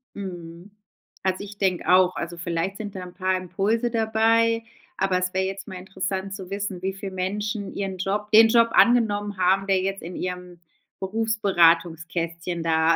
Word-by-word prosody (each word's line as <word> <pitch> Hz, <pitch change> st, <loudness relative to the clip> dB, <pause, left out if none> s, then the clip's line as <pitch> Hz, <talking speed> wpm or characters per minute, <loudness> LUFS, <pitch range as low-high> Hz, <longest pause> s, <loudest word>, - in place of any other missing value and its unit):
Mhm, 175 Hz, -1 st, -8 dB, 0.5 s
also 190 Hz, +1 st, -1 dB
ich 205 Hz, 0 st, -10 dB
denke 190 Hz, -3 st, 0 dB
auch, 185 Hz, 0 st, +5 dB
also 170 Hz, 0 st, -5 dB
vielleicht 170 Hz, +3 st, -2 dB
sind 205 Hz, -2 st, -7 dB
da 190 Hz, -, -5 dB
'n 180 Hz, -, -10 dB
paar 185 Hz, 0 st, 0 dB
Impulse 210 Hz, +6 st, -1 dB
dabei, 225 Hz, 0 st, +2 dB, 0.3 s
aber 190 Hz, -1 st, +1 dB
es 185 Hz, 0 st, -2 dB
wär 190 Hz, 0 st, +1 dB
jetzt 195 Hz, +1 st, -5 dB
mal 190 Hz, -, -7 dB
interessant 190 Hz, +1 st, -4 dB
zu 190 Hz, -2 st, -8 dB
wissen, 200 Hz, -2 st, -4 dB
wie 190 Hz, 0 st, -2 dB
viel 195 Hz, 0 st, -7 dB
Menschen 200 Hz, +2 st, -3 dB
ihren 195 Hz, -2 st, -4 dB
Job 205 Hz, +3 st, -2 dB
den 225 Hz, +1 st, +8 dB
Job 230 Hz, 0 st, +4 dB
angenommen 205 Hz, -4 st, +3 dB
haben, 190 Hz, +2 st, +2 dB
der 190 Hz, -1 st, +2 dB
jetzt 195 Hz, +1 st, -3 dB
in 175 Hz, +2 st, -7 dB
ihrem, 180 Hz, -1 st, -5 dB, 0.4 s
Berufsberatungskästchen 170 Hz, -5 st, +1 dB
da, 160 Hz, 0 st, +3 dB
190 Hz, 165 wpm, -24 LUFS, 180-205 Hz, 0.5 s, den